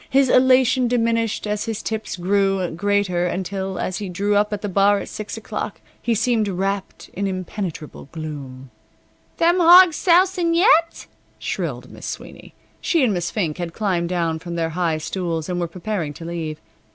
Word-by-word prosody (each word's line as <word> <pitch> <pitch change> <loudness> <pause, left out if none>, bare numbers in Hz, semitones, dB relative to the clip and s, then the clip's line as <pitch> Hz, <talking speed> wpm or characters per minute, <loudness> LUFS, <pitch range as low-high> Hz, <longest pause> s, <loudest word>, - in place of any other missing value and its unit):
His 270 -1 +3
elation 255 0 +4
diminished 230 -2 0
as 210 0 -2
his 225 -2 -4
tips 220 -1 -3
grew 195 0 +1
greater 185 0 0
until, 190 +1 -3
as 185 - -3
he 200 -3 -5
drew 200 +3 0
up 210 +1 +2
at 210 0 -4
the - - -1
bar 200 +1 +3
at - - -7
six 215 +1 -6
o'clock, 210 -4 -5 0.2
he 235 -1 0
seemed 225 -1 +1
wrapped 195 +1 -3
in 200 +1 -2
impenetrable 185 -4 -5
gloom. 140 -5 -8 0.7
"Them 345 +2 +3
hawgs 350 -1 +8
sousin' 355 -1 +3
yet?" 335 -3 +3 0.3
shrilled - - -4
Miss - - -9
Sweeney. - - -9 0.3
She 330 -5 +2
and 230 -5 +2
Miss 175 -2 -2
Fink 175 -7 -2
had 170 -2 -4
climbed 180 -5 -1
down 165 -3 -1
from 170 +1 -6
their 165 -1 -1
high 165 -1 0
stools, 165 -1 -3
and 180 -1 -2
were 175 - -1
preparing 170 -3 -4
to 165 - -9
leave. 160 -2 -4
195 Hz, 170 wpm, -21 LUFS, 175-230 Hz, 0.7 s, hawgs